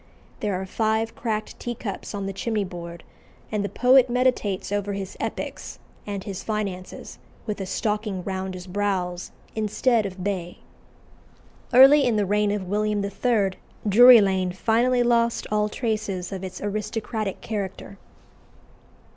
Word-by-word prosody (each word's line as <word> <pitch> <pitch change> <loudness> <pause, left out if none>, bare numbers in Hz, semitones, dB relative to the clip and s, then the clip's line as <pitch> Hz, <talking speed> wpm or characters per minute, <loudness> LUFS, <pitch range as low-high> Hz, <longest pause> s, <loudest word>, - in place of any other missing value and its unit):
There 205 -4 -1
are 190 - -4
five 220 +3 0
cracked 215 -2 -3
teacups 235 -4 -5
on 200 -1 -3
the 195 - -3
chimney 210 +2 -1
board; 170 -2 -8 0.5
and 210 -2 0
the 200 - -2
poet 255 0 +5
meditates 240 -7 0
over 205 0 -1
his 195 -1 -5
epics - - -5 0.3
and 200 -2 -4
his 195 -3 -5
finances 200 -4 -5 0.3
with 210 -3 -3
a 190 - -4
stocking 210 -2 -2
round 190 0 -4
his 180 -1 -8
brows 185 -2 -2 0.3
"instead 220 +1 +1
of 185 -1 -8
bay." 180 -3 -3 1.1
Early 270 +3 +8
in 245 -4 +2
the 210 -1 +2
reign 210 +1 +2
of 200 -2 -2
William 210 +1 0
III. 205 -1 +1 0.4
Drury 240 +3 +9
Lane 190 -2 +1
finally 240 +5 +2
lost 235 -1 +2
all 210 0 +1
traces 210 -6 -3
of 190 -1 -5
its 185 -1 -7
aristocratic 215 0 -3
character. 200 -2 -5
205 Hz, 140 wpm, -24 LUFS, 190-225 Hz, 1.1 s, Drury